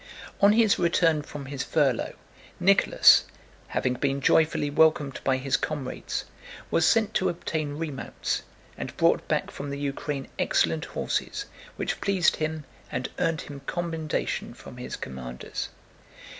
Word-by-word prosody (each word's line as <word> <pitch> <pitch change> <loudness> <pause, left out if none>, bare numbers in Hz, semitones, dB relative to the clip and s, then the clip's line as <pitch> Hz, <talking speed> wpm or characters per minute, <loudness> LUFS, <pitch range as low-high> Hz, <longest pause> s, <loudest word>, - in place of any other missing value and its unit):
On 200 +1 +7
his 220 -2 +4
return 165 -3 +3
from 145 -1 -8
his 135 -1 -4
furlough 135 -4 +1 0.4
Nicholas, - - +6 0.4
having 125 - 0
been 135 +2 0
joyfully 150 +1 +3
welcomed 150 -3 +3
by 130 -1 +2
his 135 0 +1
comrades, 145 -4 -4 0.5
was 165 - +4
sent 220 -2 +3
to 190 -3 +2
obtain 155 -4 -3
remounts 150 -4 -3 0.4
and - - -6
brought - - +3
back - - 0
from 140 - -6
the 140 - -4
Ukraine 140 0 -3
excellent 80 -1 +2
horses - - -2 0.3
which - - -3
pleased 190 -3 +3
him 155 0 -2 0.3
and - - -2
earned 165 -1 +1
him 140 -1 -9
commendation 165 -3 -2
from - - -12
his - - -5
commanders. 65 -1 -6
150 Hz, 135 wpm, -27 LUFS, 135-165 Hz, 0.5 s, On